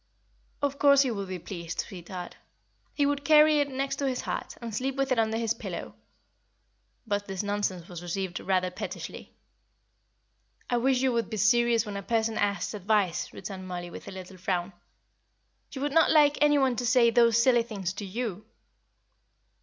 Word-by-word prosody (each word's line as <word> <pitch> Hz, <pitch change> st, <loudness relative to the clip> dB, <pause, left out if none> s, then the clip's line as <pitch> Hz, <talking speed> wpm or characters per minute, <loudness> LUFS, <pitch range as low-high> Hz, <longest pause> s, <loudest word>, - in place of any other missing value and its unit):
"Of 280 Hz, 0 st, -1 dB
course 280 Hz, -1 st, +6 dB
he 260 Hz, -, -1 dB
would 200 Hz, -3 st, -4 dB
be 185 Hz, 0 st, -4 dB
pleased, 170 Hz, -1 st, -5 dB
sweetheart; 180 Hz, -1 st, -8 dB, 0.6 s
he 290 Hz, -, +2 dB
would 285 Hz, 0 st, 0 dB
carry 305 Hz, 0 st, +6 dB
it 285 Hz, -1 st, +1 dB
next 275 Hz, +1 st, -2 dB
to 280 Hz, -, -1 dB
his 255 Hz, -2 st, -1 dB
heart, -, -, -5 dB
and 235 Hz, -2 st, -6 dB
sleep 260 Hz, +5 st, -2 dB
with 275 Hz, -1 st, -1 dB
it 250 Hz, -, +3 dB
under 220 Hz, 0 st, +1 dB
his 225 Hz, -1 st, 0 dB
pillow." -, -, -6 dB, 1.1 s
But 205 Hz, -2 st, -2 dB
this 195 Hz, 0 st, -3 dB
nonsense 200 Hz, -4 st, -2 dB
was 175 Hz, -2 st, -8 dB
received 175 Hz, 0 st, -3 dB
rather 185 Hz, -1 st, 0 dB
pettishly. -, -, -7 dB, 1.4 s
"I 245 Hz, -, +3 dB
wish 255 Hz, +1 st, +2 dB
you 260 Hz, -, +3 dB
would 230 Hz, -1 st, -1 dB
be 220 Hz, -, -4 dB
serious 235 Hz, +2 st, +3 dB
when 205 Hz, -1 st, -5 dB
a -, -, -4 dB
person 225 Hz, 0 st, 0 dB
asks 205 Hz, +1 st, 0 dB
advice," 205 Hz, -3 st, 0 dB
returned 190 Hz, -2 st, -8 dB
Mollie, 175 Hz, -1 st, -5 dB
with -, -, -10 dB
a -, -, -6 dB
little 190 Hz, 0 st, -9 dB
frown. 180 Hz, 0 st, -2 dB, 1.0 s
"You 265 Hz, -, -6 dB
would 285 Hz, 0 st, -1 dB
not 325 Hz, +1 st, +5 dB
like 295 Hz, -2 st, +5 dB
any 295 Hz, 0 st, +5 dB
one 265 Hz, -3 st, +2 dB
to 245 Hz, -, -1 dB
say 235 Hz, -1 st, +5 dB
those 230 Hz, -1 st, +4 dB
silly 240 Hz, 0 st, +4 dB
things 200 Hz, -6 st, -4 dB
to 205 Hz, +1 st, -6 dB
you." 210 Hz, 0 st, -4 dB
225 Hz, 180 wpm, -28 LUFS, 190-265 Hz, 1.4 s, course